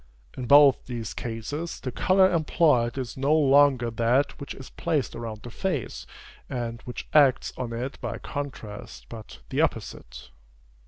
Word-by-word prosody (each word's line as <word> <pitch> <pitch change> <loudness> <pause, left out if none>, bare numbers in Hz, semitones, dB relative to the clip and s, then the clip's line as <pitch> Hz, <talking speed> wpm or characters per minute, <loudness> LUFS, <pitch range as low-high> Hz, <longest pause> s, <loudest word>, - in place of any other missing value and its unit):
In 125 -2 -5
both 145 0 +6
these 115 -4 -5
cases, 125 +8 -5
the 130 - -5
color 185 +8 +3
employed 150 -7 +2
is 130 -3 -4
no 140 +3 +2
longer 140 -5 +4
that 120 +7 +1
which 140 - -7
is 130 -2 -11
placed 155 -6 -1
around 115 -2 -7
the 120 - -8
face, 160 - -3 0.4
and 120 -2 -4
which 125 - -7
acts 140 -4 +4
on 125 -2 -4
it 125 +4 -5
by - - -4
contrast, 105 - -7
but 110 -2 -10
the - - 0
opposite. - - -4
130 Hz, 150 wpm, -26 LUFS, 115-145 Hz, 0.4 s, both